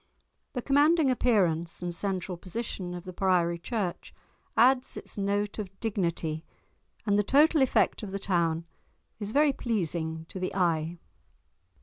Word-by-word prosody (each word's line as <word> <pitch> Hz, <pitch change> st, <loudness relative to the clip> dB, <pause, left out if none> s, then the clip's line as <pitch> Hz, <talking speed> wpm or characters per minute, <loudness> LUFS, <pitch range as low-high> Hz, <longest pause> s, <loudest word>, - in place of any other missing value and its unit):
The 250 Hz, -3 st, -3 dB
commanding 290 Hz, +1 st, +4 dB
appearance 180 Hz, -10 st, +1 dB
and 175 Hz, -1 st, -2 dB
central 185 Hz, 0 st, -2 dB
position 185 Hz, -1 st, -5 dB
of 175 Hz, -, -7 dB
the 185 Hz, -1 st, -8 dB
priory 175 Hz, -2 st, +2 dB
church 195 Hz, -1 st, -4 dB, 0.4 s
adds 255 Hz, +2 st, +4 dB
its -, -, -8 dB
note 205 Hz, +1 st, -1 dB
of 195 Hz, -2 st, -7 dB
dignity, 170 Hz, -7 st, -1 dB, 0.6 s
and 205 Hz, -1 st, +3 dB
the -, -, +3 dB
total 300 Hz, +6 st, +4 dB
effect 265 Hz, -, +2 dB
of 210 Hz, -, -5 dB
the 195 Hz, -, -3 dB
town 170 Hz, -4 st, 0 dB, 0.5 s
is 205 Hz, -2 st, -4 dB
very 285 Hz, +4 st, +4 dB
pleasing 165 Hz, -, -2 dB
to 190 Hz, -, -5 dB
the 185 Hz, -, -3 dB
eye. 170 Hz, -2 st, +1 dB
195 Hz, 140 wpm, -28 LUFS, 170-230 Hz, 0.6 s, commanding